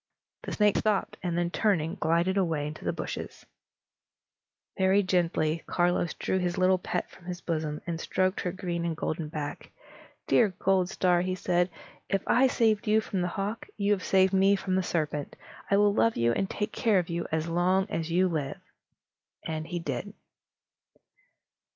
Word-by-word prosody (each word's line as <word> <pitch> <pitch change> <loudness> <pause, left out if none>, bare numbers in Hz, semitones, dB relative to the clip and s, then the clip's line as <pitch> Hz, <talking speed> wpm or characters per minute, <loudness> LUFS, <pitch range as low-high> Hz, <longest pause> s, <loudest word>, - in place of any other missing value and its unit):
The - - -6
snake 210 -1 +3
stopped, 210 -2 0
and 175 -2 -2
then 175 0 0
turning, 175 -6 +1
glided 170 0 +1
away 165 -7 0
into 150 +1 -7
the - - 0
bushes. - - -6 1.3
Very 190 +1 +3
gently, 170 -3 +1
Carlos 175 -1 +1
drew 190 - -1
his 175 -1 -1
little 185 0 +3
pet 180 0 -3
from 180 - -17
his 180 -1 -5
bosom, 155 -3 -3
and 165 -2 -3
stroked 185 +1 0
her 180 - -2
green 175 -2 -3
and 165 -2 -2
golden 155 0 -3
back. 145 -1 -5 0.6
"Dear 205 -6 +3
Goldstar," 185 -1 +2
he 185 +1 -1
said, 180 -1 +1 0.4
"if 195 -1 0
I 255 +3 +4
saved 220 -3 +1
you 215 +1 +4
from 200 -3 -3
the 180 - 0
hawk, 200 +5 -4
you 200 0 +1
have 200 -3 +1
saved 190 0 +3
me 195 +1 +5
from 190 -1 -3
the 190 - +3
serpent. 155 -5 -2 0.3
I 200 - +4
will 205 0 +4
love 230 +2 +2
you 115 0 +3
and 190 +11 -1
take 210 +1 -3
care 220 -5 +2
of 175 -2 +1
you 170 0 -2
as 160 +1 -1
long 180 +3 +2
as 165 0 -2
you 180 +3 +3
live." 155 -6 -3 0.9
And 155 -1 -3
so - - -14
he 175 - -2
did. 165 +5 -4
180 Hz, 175 wpm, -28 LUFS, 165-195 Hz, 1.3 s, me